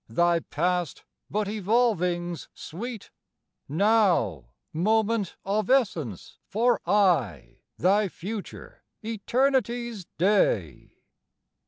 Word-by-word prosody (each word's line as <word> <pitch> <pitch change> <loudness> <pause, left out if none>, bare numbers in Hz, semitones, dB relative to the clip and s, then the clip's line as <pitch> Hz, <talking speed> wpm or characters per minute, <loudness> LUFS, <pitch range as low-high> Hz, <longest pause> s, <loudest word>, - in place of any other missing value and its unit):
Thy 170 +8 +2
past, 175 0 -2 0.3
but 210 0 -1
evolvings 185 -5 0
sweet, 225 +6 -7 0.6
Now, 180 - +2 0.3
moment 215 +3 +1
of 200 +1 -1
essence 175 - 0
for 240 +4 +1
aye, 165 - +1 0.2
Thy 200 +4 +3
future, 200 +4 -8 0.2
eternity's 235 -1 -1
day! 155 - +1
200 Hz, 75 wpm, -26 LUFS, 170-225 Hz, 0.6 s, Thy